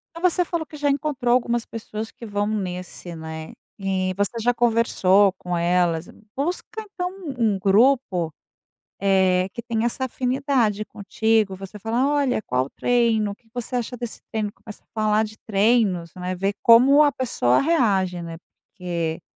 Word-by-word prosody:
Mas 345 +1 +2
você 360 - +2
falou 340 -2 -3
que 305 - -11
já 290 0 +1
encontrou 275 -4 0
algumas 240 -1 +1
pessoas 220 -1 -6
que 235 - -11
vão 205 -1 -1
nesse, 180 -4 -5
né, 160 0 -7 0.3
e 190 -1 -1
você 205 +3 -1
já 245 +2 +2
conversou 220 -5 +3
com 180 -2 -4
elas. 175 -1 +1 0.3
Busca 350 +9 -3
então, 360 -2 -3
um 380 -3 -11 0.3
um - - -5
grupo, 195 - +3 0.7
eh, 190 -2 +3
que 235 - -7
tenha 230 0 -1
essa 260 +3 -1
afinidade 250 -4 0
contigo, 215 0 0
você 195 +2 -9
fala: 230 +5 0
"Olha, 285 -5 +1
qual 125 -5 0
o - - -14
treino? 230 -4 +1
O - - -8
que 225 +2 -33
você 245 +1 -4
acha 245 +1 -3
desse 240 -2 -6
treino?". 215 -2 -1
Começa 215 -1 -13
a - - -43
falar 215 0 +2
de 215 0 -9
treinos, 200 -5 +2
não 180 - -8
é, 185 +1 -1
ver 195 +2 -1
como 260 +6 +7
a 290 -1 +4
pessoa 125 - +1
reage, 195 - +1
né. 165 -1 -7 0.3
Porque 170 -3 -3
215 Hz, 170 wpm, -23 LUFS, 185-245 Hz, 0.7 s, como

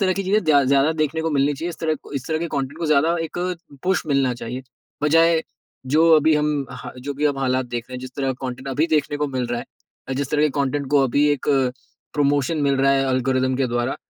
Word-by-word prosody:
तरह 185 -2 +3
की 195 - -2
चीज़ें 210 +3 +2
दया 145 -3 +5
ज़्यादा 140 +4 +3
देखने 160 +2 -1
को 160 - -1
मिलनी 145 0 +2
चाहिए। 165 +5 -4
इस - - -10
तरह 160 -1 +1 0.2
इस 135 -1 -4
तरह 160 - 0
के 170 - -2
कंटेंट 140 +3 -3
को 170 - -2
ज़्यादा 155 +3 +3
एक 165 - -6 0.4
पुश 190 0 +1
मिलना 135 -4 +1
चाहिए, 125 +2 -6 0.4
बजाए 165 +2 +4 0.4
जो 155 +5 +4
अभी 155 +1 +4
हम 150 -2 0
हाँ, 125 -1 -8
जो 140 +3 -5
भी 145 +2 -2
अब 140 -2 -1
हालात 130 -1 0
देख 120 -1 -4
रहे 130 - -8
हैं 125 - -5
जिस 130 0 -8
तरह 135 -2 0
का 130 +1 -7
कंटेंट 130 +2 -6
अभी 145 +5 +1
देखने 150 -1 +1
को 150 0 -1
मिल 130 -2 -2
रहा 120 0 -2
है - - -8 0.4
अ, - - -2
जिस 135 0 -2
तरह 150 0 +2
के 150 - +4
कंटेंट 140 +1 -1
को 145 -2 +4
अभी 145 +4 +2
एक 145 - -4 0.7
प्रमोशन 145 +1 +1
मिल 140 -1 +2
रहा 135 0 +3
है 135 0 +1
एल्गोरिथम 130 0 +1
के 135 - +1
द्वारा 120 +2 -1
140 Hz, 245 wpm, -22 LUFS, 130-155 Hz, 0.7 s, दया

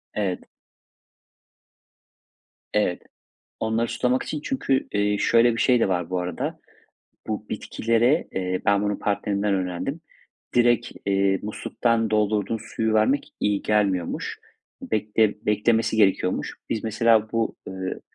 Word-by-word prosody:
Evet. 95 -4 -1 2.3
Evet. 105 -4 +1 0.6
Onları 110 +1 0
sulamak 125 +2 0
için. 150 - -4
Çünkü, 195 - 0
iii, 105 0 +1
şöyle 115 0 +4
bir - - -1
şey 125 -2 +4
de - - +3
var 90 -3 -1
bu 90 0 -1
arada, 90 -1 -3 0.7
bu 105 0 -4
bitkilere, 115 +7 +1
eee, 90 -1 -2
ben 100 0 +4
bunu 105 -1 -1
partnerimden 100 0 0
öğrendim. 95 - -3 0.5
Direkt, 120 0 +3
eee, 95 -1 +2
musluktan 115 +1 -1
doldurduğun 105 0 +1
suyu 110 0 -2
vermek 120 +6 +2
iyi 105 -1 +1
gelmiyormuş. 100 -5 0 0.4
Bekle 110 0 +1
beklemesi 110 +2 +2
gerekiyormuş. 95 -3 +2 0.2
Biz, 110 - -2
mesela, 110 0 +2
bu, 115 -1 0
ııı, 95 0 -5
105 Hz, 120 wpm, -24 LUFS, 100-115 Hz, 2.3 s, şöyle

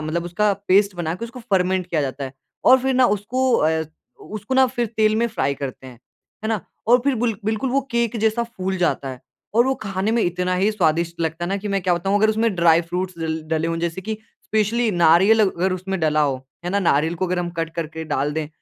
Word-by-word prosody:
मतलब 155 +2 -2
उसका 205 +4 +1 0.2
पेस्ट 200 +1 +4
बना 165 -2 -2
के 210 +6 -6
उसको 235 +2 -9
फर्मेंट 185 -1 +1
किया 170 -3 -1
जाता 135 0 -4
है। 130 - -7 0.3
और 260 - +7
फिर 265 0 +1
ना 255 0 +5
उसको 245 +5 0
अ, 160 +1 +2 0.4
उ - - -13
उसको 215 +5 -3
ना 265 0 +6
फिर 240 -1 -2
तेल 215 -1 +3
में 235 +1 +2
फ्राई 140 -10 -1
करते 135 -1 -7
हैं, 125 -2 -12 0.5
है 220 - -1
ना? 220 -4 0 0.3
और 245 +2 +6
फिर 280 -1 +2
बिल 230 -1 0
बिल्कुल 220 +4 -1
वो 275 +2 +2
केक 235 -1 0
जैसा 220 +2 +2
फूल 190 -5 -4
जाता 145 -6 0
है 130 -2 -7 0.3
और 235 +2 +4
वो 265 - +2
खाने 195 0 -1
में 235 - +2
इतना 180 +1 0
ही 195 +4 +2
स्वादिष्ट 170 -2 0
लगता 165 +1 -2
है 175 - -3
ना 195 - 0
कि 205 +1 -5
मैं 195 -1 0
क्या 180 0 +2
बताऊँ 195 +4 0
अगर 215 +1 +3
उसमें 220 -1 +1
ड्राई 170 -1 +4
फ्रूट्स 180 0 -3
डल 160 -1 -2
डले 160 0 0
हों 165 - -1
जैसे 170 +2 -2
कि 220 +4 -4 0.3
स्पेशली 220 +2 +1
नारियल 175 +5 +5
अगर 185 +1 -1
उसमें 190 +1 -3
डला 155 -1 +2
हो, 140 -3 +1 0.3
है 175 - -2
ना? 200 - +1
नारियल 165 -3 +2
को 185 +2 -2
अगर 180 0 -1
हम 175 -1 -2
कट 165 - -2
करके 160 -1 -5
डाल 145 +2 0
दें 155 -1 -3
185 Hz, 240 wpm, -22 LUFS, 165-220 Hz, 0.5 s, और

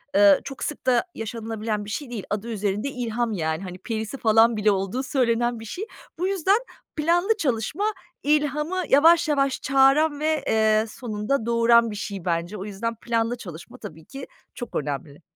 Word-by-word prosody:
eee, 300 -1 +7
çok 270 - -7
sık 300 - -5
da 250 -2 +3
yaşanılabilen 220 -1 -4
bir - - -8
şey 255 +5 -4
değil, 230 -5 -5
adı 205 +2 -3
üzerinde 210 +3 -1
ilham, 240 -3 -2
yani, 160 -1 -2
hani, 180 -1 -7
perisi, 220 +4 -4
falan, 225 -1 +4
bile 210 0 +3
olduğu 195 +6 -1
söylenen 240 -3 +1
bir 225 - -9
şey. 355 - -5 0.3
Bu 365 - +1
yüzden 390 +1 +2 0.4
planlı 350 +8 +2
çalışma 260 - -1 0.4
ilhamı 300 +4 +1
yavaş 330 +4 +6
yavaş 275 -2 +1
çağıran 275 +3 +4
ve, 310 -1 0
eee, 220 0 +3
sonunda 220 +2 -2
doğuran 235 0 +4
bir - - -6
şey, 200 -3 -6
bence. 170 +3 -1
O 190 - -6
yüzden 215 +3 -4
planlı 230 +1 -1
çalışma, 175 -7 -10
tabii 160 0 -10
ki, 275 - -9 0.3
çok 245 - -7
önemli. 145 +1 -4
230 Hz, 170 wpm, -24 LUFS, 210-280 Hz, 0.4 s, eee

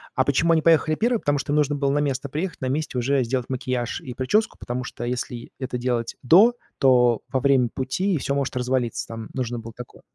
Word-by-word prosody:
а 130 - +3
почему 160 +5 +2
они 160 - +3
поехали 155 -1 +4
1? 235 +3 +1
Потому 145 -5 0
что 140 +1 -3
им 150 - +2
нужно 145 0 +2
было 140 -1 0
на 145 - +1
место 140 -1 -2
приехать, 165 +5 -4
на 130 - -1
месте 145 -1 -2
уже 130 +2 +1
сделать 125 +1 -2
макияж 125 -2 -2
и 125 - -7
причёску, 135 - 0
потому 125 +1 -4
что 120 - -7
если 120 -1 -4
это 130 -2 -3
делать 120 -2 -2
до, 195 - +6 0.3
то 125 -3 +4
во 130 - +1
время 135 -3 +3
пути 170 +8 -1
всё 140 - -2
может 140 -1 -2
развалиться, 125 -2 -1
там 115 -1 -7
нужно 120 -2 -3
было 115 0 -9
такое 125 -1 -11
130 Hz, 220 wpm, -23 LUFS, 125-145 Hz, 0.3 s, до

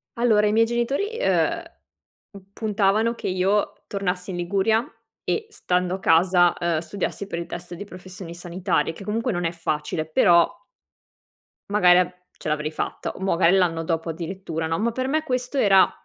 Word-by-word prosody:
Allora 220 -3 +3
i - - +2
miei 225 +1 +4
genitori, 270 - -1
uhm, - - +1 0.9
puntavano 215 +1 +1
che - - -5
io 195 +3 0
tornassi 190 -2 -3
in 180 - -4
Liguria 200 +6 +1 0.4
e 445 - -1
stando 180 - -1
a - - -7
casa, 175 0 +4
uhm, 170 -2 0
studiassi 195 +4 -4
per 170 - -4
il 170 - -4
test 175 +1 -7
di 175 - -7
professioni 185 -2 -10
sanitarie 175 -1 -1
che 195 - -10
comunque 225 +4 -1
non 175 -3 -2
è 165 - 0
facile 155 -2 -2
però 170 +2 +5 1.2
magari 180 -3 +5
av 180 0 +1 0.3
ce - - -8
l'avrei 150 0 -1
fatta - - -4
o - - -13
magari 185 -1 +3
l'anno 165 -3 +1
dopo 165 0 -2
addirittura 165 0 -4
no, 165 +2 -1
ma 235 +2 +1
per 260 +2 -2
me 310 +2 +1
questo 255 -1 -2
era 195 -6 +5
185 Hz, 170 wpm, -24 LUFS, 170-210 Hz, 1.2 s, però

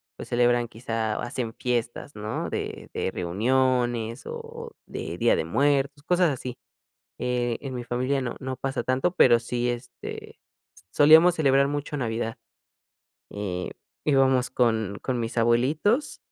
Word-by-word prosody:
pues - - -9
celebran 120 -1 +2
quizá 115 -2 -2
o - - -3
hacen 120 -2 -3
fiestas 120 +3 -3
¿no?, 105 +1 -4
de - - -5
de - - -1
reuniones 120 +5 0
o 465 0 -7
de - - -6
día - - +3
de 470 - 0
muertos 140 0 +1
cosas 180 +1 +3
así, 125 -2 -5 0.6
eh, 120 -1 -1
en 135 -2 -5
mi 120 -1 -5
familia 130 +3 0
no 120 -2 -3
no 130 -1 -4
pasa 135 0 -2
tanto 130 +7 +1
pero 120 -8 +6
sí, 120 +1 -2
est, 120 0 -4 1.0
solíamos 160 +4 +7
celebrar 140 -3 +4
mucho 145 +1 -3
Navidad, 115 -1 -2 0.9
eh, 95 -3 -4 0.3
íbamos 135 -3 +3
con 110 -5 +1
con 130 -2 -1
mis 115 0 -4
abuelitos. 135 - +2
125 Hz, 140 wpm, -26 LUFS, 115-140 Hz, 1.0 s, solíamos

